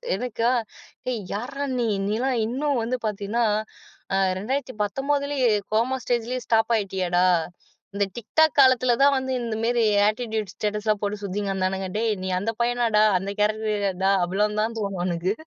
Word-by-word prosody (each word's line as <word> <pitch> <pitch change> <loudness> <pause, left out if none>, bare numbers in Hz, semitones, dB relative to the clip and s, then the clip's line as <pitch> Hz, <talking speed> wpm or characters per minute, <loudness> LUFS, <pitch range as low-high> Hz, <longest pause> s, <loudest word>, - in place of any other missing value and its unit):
எனக்கா 235 +1 0 0.6
எ - - 0 0.2
யார்ரா 275 +7 -4
நீ? 235 - +1 0.2
நீலாம் 245 +4 0
இன்னும் 270 +2 -1
வந்து 245 +3 -1
பார்த்தீன்னா, 210 +3 -1 0.7
அ - - +3 0.2
2019லயே 270 +3 -1 0.2
கோமா 245 +4 +2
ஸ்டேஜ்லயே 245 +1 -1
ஸ்டாப் 225 +1 +2
ஆயிட்டியேடா. 185 -3 0 0.7
இந்த 200 0 +2
டிக்டாக் 315 +7 +2
காலத்துல 255 -2 +5
தான் 280 -1 +5
வந்து 260 0 -3
இந்த 230 -2 -3
மாரி 240 0 +2 0.3
ஆட்டிட்யூட் 220 -3 -3
ஸ்டேட்டஸ்லாம் 210 0 -1
போட்டுச் 205 0 -3
சுத்திங்க்கெடந்தானுங்க. 190 -1 -2
டேய் 225 -1 +1
நீ 190 - -2
அந்தப் 225 +4 -3
பையனாடா? 235 -3 +2 0.2
அந்த 195 +2 -4
கேரக்டர்டா? 210 -3 0
அவ்வளவு 210 +4 0
தான் 225 +1 -2 0.3
உனக்கு. 175 +2 0
220 Hz, 130 wpm, -24 LUFS, 205-250 Hz, 0.7 s, காலத்துல